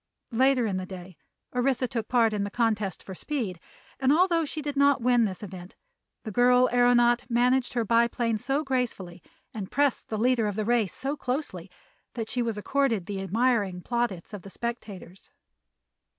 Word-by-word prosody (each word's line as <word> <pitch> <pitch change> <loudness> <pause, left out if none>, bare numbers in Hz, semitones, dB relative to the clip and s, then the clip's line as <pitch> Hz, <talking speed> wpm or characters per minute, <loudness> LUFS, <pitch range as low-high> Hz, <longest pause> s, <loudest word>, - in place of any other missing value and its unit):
Later 255 +1 +3
in 195 -4 -1
the 185 0 -5
day 185 -1 -10 0.4
Orissa 255 0 +1
took 230 -2 -4
part 230 -3 +3
in 205 -1 -1
the 200 - -3
contest 215 -4 -1
for 190 - -8
speed 210 - -4 0.4
and 265 0 +3
although 335 0 +3
she 310 - -5
did 290 -1 -4
not 280 0 +4
win 245 -2 +4
this 190 0 -5
event 185 -2 -9 0.5
the 220 - -6
girl 250 +3 +4
aëronaut 245 0 +3
managed 245 +1 +2
her 235 -2 0
biplane 230 0 +1
so 275 +6 -1
gracefully 235 - -3 0.3
and 200 -3 -6
pressed 285 -2 0
the 215 - -2
leader 235 -1 +2
in 205 - -3
the 215 0 -2
race 230 -4 +1
so 275 +2 -3
closely 250 - -4 0.5
that 225 -2 -4
she 250 - -1
was 230 -3 -2
accorded 230 -3 0
the 195 0 -4
admiring 205 -2 +1
plaudits 225 -3 -3
of 205 - -6
the 195 - -11
spectators. 200 -5 -7
235 Hz, 175 wpm, -27 LUFS, 200-255 Hz, 0.5 s, not